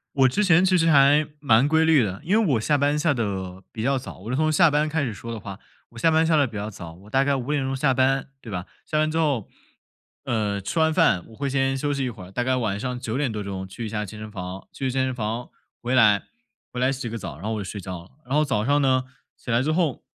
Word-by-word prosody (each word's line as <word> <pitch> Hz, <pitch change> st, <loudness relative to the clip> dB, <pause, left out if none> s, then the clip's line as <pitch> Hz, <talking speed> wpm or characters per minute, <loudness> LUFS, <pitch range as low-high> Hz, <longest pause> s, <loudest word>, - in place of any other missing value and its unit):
我 135 Hz, -1 st, +5 dB
之 210 Hz, +12 st, +1 dB
前 180 Hz, -1 st, +5 dB
其 185 Hz, -1 st, +4 dB
实 165 Hz, 0 st, +3 dB
还 145 Hz, +1 st, +5 dB
蛮 135 Hz, -1 st, +4 dB
规 160 Hz, +1 st, +3 dB
律 155 Hz, -6 st, +5 dB
的。 100 Hz, +5 st, -4 dB
因 205 Hz, +7 st, +2 dB
为 175 Hz, -11 st, +2 dB
我 115 Hz, -, +2 dB
下 145 Hz, +5 st, +2 dB
班 145 Hz, +1 st, +1 dB
下 155 Hz, 0 st, +2 dB
得 95 Hz, -6 st, -4 dB
比 110 Hz, -, -5 dB
较 135 Hz, +1 st, +2 dB
早 130 Hz, -, -8 dB
我 110 Hz, +6 st, -7 dB
是 -, -, 0 dB
从 155 Hz, +2 st, +2 dB
下 160 Hz, 0 st, +5 dB
班 150 Hz, +1 st, +2 dB
开 155 Hz, -1 st, 0 dB
始 115 Hz, -, -2 dB
说 115 Hz, +4 st, -8 dB
的 115 Hz, -, -5 dB
话， 100 Hz, +1 st, -8 dB, 0.3 s
我 115 Hz, -, -16 dB
下 165 Hz, -, +4 dB
班 160 Hz, +1 st, +3 dB
下 160 Hz, 0 st, +3 dB
得 145 Hz, -3 st, +3 dB
比 115 Hz, -, -11 dB
较 105 Hz, +1 st, -4 dB
早， 85 Hz, -5 st, -9 dB
我 100 Hz, +5 st, -16 dB
大 135 Hz, +3 st, +3 dB
概 140 Hz, 0 st, +1 dB
5:00 135 Hz, 0 st, -1 dB
下 135 Hz, 0 st, +2 dB
班， 135 Hz, +1 st, +1 dB
对 110 Hz, -, -9 dB
吧？ 90 Hz, 0 st, -4 dB, 0.2 s
下 155 Hz, -, -2 dB
班 155 Hz, 0 st, +2 dB
之 160 Hz, -, -2 dB
后， 140 Hz, -10 st, 0 dB, 0.8 s
呃， 105 Hz, -3 st, -1 dB
吃 165 Hz, -, -2 dB
完 160 Hz, 0 st, +3 dB
饭 90 Hz, -, +3 dB
我 110 Hz, -, -15 dB
会 140 Hz, +2 st, -2 dB
先 135 Hz, 0 st, +1 dB
休 145 Hz, +1 st, -1 dB
息 135 Hz, -1 st, -1 dB
一 -, -, -1 dB
会 105 Hz, -6 st, -9 dB
儿， 90 Hz, -, -12 dB
大 120 Hz, +5 st, -1 dB
概 130 Hz, 0 st, +1 dB
晚 105 Hz, -5 st, -1 dB
上 125 Hz, +1 st, -3 dB
9 120 Hz, +1 st, -3 dB
点 140 Hz, -5 st, 0 dB
多 105 Hz, -1 st, -4 dB
钟 95 Hz, -1 st, -5 dB
去 115 Hz, +5 st, -7 dB
一 110 Hz, -, -4 dB
下 105 Hz, -1 st, -3 dB
健 105 Hz, +3 st, -10 dB
身 110 Hz, 0 st, -8 dB
房， 90 Hz, -1 st, -7 dB
去 135 Hz, -2 st, -3 dB
健 130 Hz, +1 st, 0 dB
身 130 Hz, -, -2 dB
房 115 Hz, 0 st, -4 dB, 0.3 s
回 120 Hz, +2 st, -2 dB
来， 105 Hz, -5 st, +5 dB, 0.5 s
回 125 Hz, -, -5 dB
来 130 Hz, +1 st, +2 dB
洗 135 Hz, -2 st, -4 dB
个 115 Hz, -, -5 dB
澡， 75 Hz, -, -7 dB
然 90 Hz, -, -13 dB
后 110 Hz, -, -1 dB
我 110 Hz, -, -3 dB
就 -, -, -4 dB
睡 100 Hz, +2 st, -6 dB
觉 90 Hz, -2 st, -7 dB
了。 90 Hz, -, -19 dB, 0.2 s
然 130 Hz, -, -5 dB
后 150 Hz, -, +4 dB
早 110 Hz, -7 st, 0 dB
上 145 Hz, +1 st, +3 dB
呢， 130 Hz, -1 st, +2 dB, 0.3 s
起 120 Hz, -, -6 dB
来 120 Hz, +2 st, +3 dB
之 155 Hz, +3 st, 0 dB
后， 160 Hz, -5 st, 0 dB
130 Hz, 300 characters per minute, -24 LUFS, 105-145 Hz, 0.8 s, 我